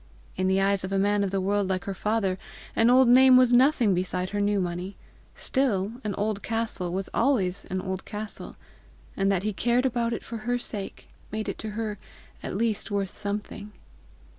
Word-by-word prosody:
In 185 - 0
the 190 +1 +2
eyes 195 0 +2
of 190 - -4
a 195 - +1
man 205 +1 +2
of 195 - 0
the 195 +1 -1
world 200 +1 0
like 185 -1 -1
her 200 - -4
father, 195 -2 -1 0.4
an 225 +1 +4
old 255 +1 +6
name 255 +1 +7
was 250 -1 +5
nothing 245 -4 +4
beside 180 +1 -2
new 205 0 +1
money! 180 +2 -4 0.4
still 215 -7 0
an 205 -3 -2
old 205 0 -1
castle 225 -6 -2
was 190 +2 -3
always 205 -8 +1
an 185 0 -3
old 190 0 -4
castle! 210 0 -6 0.6
and 195 0 +1
that 190 -2 0
he 215 0 -1
cared 240 +5 +1
about 235 -2 0
it 230 - -4
for 230 - -6
her 245 +3 -1
sake 210 -5 -5 0.2
made 215 0 -3
it 200 - -4
to 220 - -5
her 215 -3 -3 0.4
at - - -4
least 225 -1 0
worth 200 -2 -2
something! 205 0 -5
205 Hz, 190 wpm, -26 LUFS, 190-230 Hz, 0.6 s, name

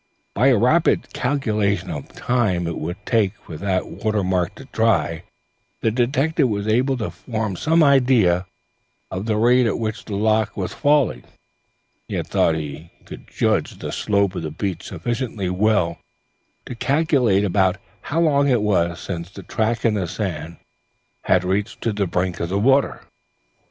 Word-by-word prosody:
By 125 +6 +3
a 130 -4 +5
rapid 125 +10 +2
calculation 105 -8 0
of 75 -3 -6
the - - -21
time 110 -8 0
it 85 -1 -3
would 85 +4 -4
take 105 -5 +1
for 80 - -11
that 95 0 -1
watermark 95 -5 -1
to 135 - -11
dry, 110 - 0 0.6
the 110 - +2
detective 135 +4 +1
was 100 -1 -2
able 130 +5 +2
to 110 - -3
form 110 -5 -4
some 160 - +3
idea 120 -11 +4 0.6
of 95 +4 -4
the 110 -2 +1
rate 120 +2 +4
at 110 - 0
which 110 -2 -3
the 105 - -4
loch 110 +1 +1
was - - -3
falling, 145 -3 +2
and - - -23 0.9
he - - -1
thought 80 - +1
he 75 +1 -6 0.2
could - - -11
judge - - 0
the - - -5
slope 100 -2 +1
of 90 - -4
the 80 - -4
beach 90 +2 -4
sufficiently 105 0 -3
well 90 -4 +1 0.7
to - - -6
calculate 130 -6 +2
about 95 -1 +2 0.2
how 160 - -2
long 145 -3 +3
it 120 -5 +2
was 85 -4 +1
since 85 -2 -5
the 100 0 -11
track 115 +5 -1
in 115 - +3
the 95 -4 -1
sand 85 -4 -4 0.7
had 90 - +3
reached 95 +3 -1
to 115 - 0
the 100 -2 -1
brink 90 +1 -1
of 85 - -2
the 95 - 0
waves. 135 +6 +2
105 Hz, 165 wpm, -21 LUFS, 90-125 Hz, 0.9 s, a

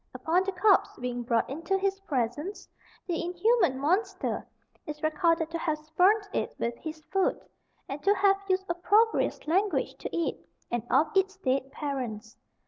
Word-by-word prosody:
Upon 350 +3 +1
the 390 - -1
corpse 390 +1 +3
being 245 0 -3
brought 235 -1 +1
into 330 +8 -1
his 390 0 -1
presence, 300 - -3 0.4
the 345 -2 -2
inhuman 355 - +2
monster 370 +7 -1 0.4
is 300 +1 -7
recorded 325 +1 +1
to 335 - -3
have 310 -2 0
spurned 365 +8 +2
it - - -2
with 235 0 -2
his 315 -1 -7
foot, 385 -1 +2 0.5
and 280 +2 -5
to 405 +5 +3
have 395 -1 +4
used 380 0 +1
opprobrious 410 +6 +2
language 380 +6 +1
to - - -5
it, 335 - -2 0.3
and 240 -1 0
of 295 +8 +2
its 385 +1 +2
dead 270 -5 -1
parents. 250 -7 -4
335 Hz, 155 wpm, -28 LUFS, 280-385 Hz, 0.5 s, have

